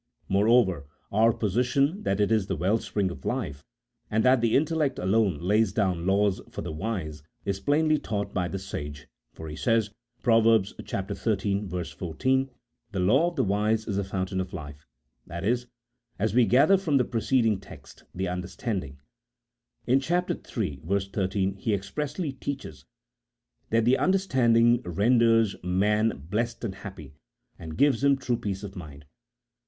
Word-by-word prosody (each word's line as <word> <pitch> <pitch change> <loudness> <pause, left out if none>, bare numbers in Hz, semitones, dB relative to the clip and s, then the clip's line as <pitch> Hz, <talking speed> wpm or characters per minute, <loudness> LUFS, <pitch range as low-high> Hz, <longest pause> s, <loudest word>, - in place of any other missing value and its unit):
Moreover 100 - +3 0.2
our 110 +3 +4
position 125 - +1
that 100 - -1
it 105 +1 +2
is 110 -4 +2
the 95 - -1
well 95 +8 +1
spring 100 -4 -1
of 70 -6 -10
life, 70 0 -3 0.5
and 110 +2 +1
that 130 -1 +5
the 115 -1 +2
in 145 - +4
tellect 150 -4 -1
alone 95 -2 +2
lays 105 +5 +2
down 90 -4 0
laws 100 0 +2
for - - -6
the - - -5
wise, 80 -4 -4 0.2
is 100 -1 -1
plainly 155 +3 +2
taught 100 -2 -3
by 90 -2 0
the 95 - -4
sage, 75 -6 -7 0.2
for 80 - -9
he 75 - -6
says 115 +1 +1 0.3
(Prov. 115 -3 +5 0.2
xiii. 100 +1 -2 0.3
14): 130 +12 0 0.2
" 115 - -50
The 95 - -2
law 130 - +4
of 175 - -13
the 130 - +1
wise 105 +2 +1
is 100 -2 -1
a - - 0
fountain 95 0 -2
of 90 - -7
life 75 -3 -9
" - - -51
— - - -42
that 85 -1 -6
is, 120 +4 0 0.5
as 105 +1 0
we 120 -1 +4
gather 145 - +5
from 155 -7 +1
the 125 - +2
preceding 115 -2 +1
text, 100 - -14
the 95 +1 -3
understanding. 90 - -4 0.9
In 130 +2 +4
chap. 175 +6 0
iii. 70 -2 -4
13, 95 +2 -1
he 105 +2 0
ex 100 0 -7
pressly 150 -1 -3
teaches 105 - -6 0.8
that 115 0 +2
the 125 +2 +4
understanding 120 -11 +3
renders 115 +2 +3
man 100 -2 +1
blessed 115 +3 -1
and 105 -5 -2
happy, 90 -8 -10 0.5
and 80 -1 -8
gives 140 -3 +3
him 140 -1 +4
true 125 -3 -1
peace 100 -2 -4
of 100 -1 -7
mind. 75 -5 -10
105 Hz, 165 wpm, -27 LUFS, 95-120 Hz, 0.9 s, that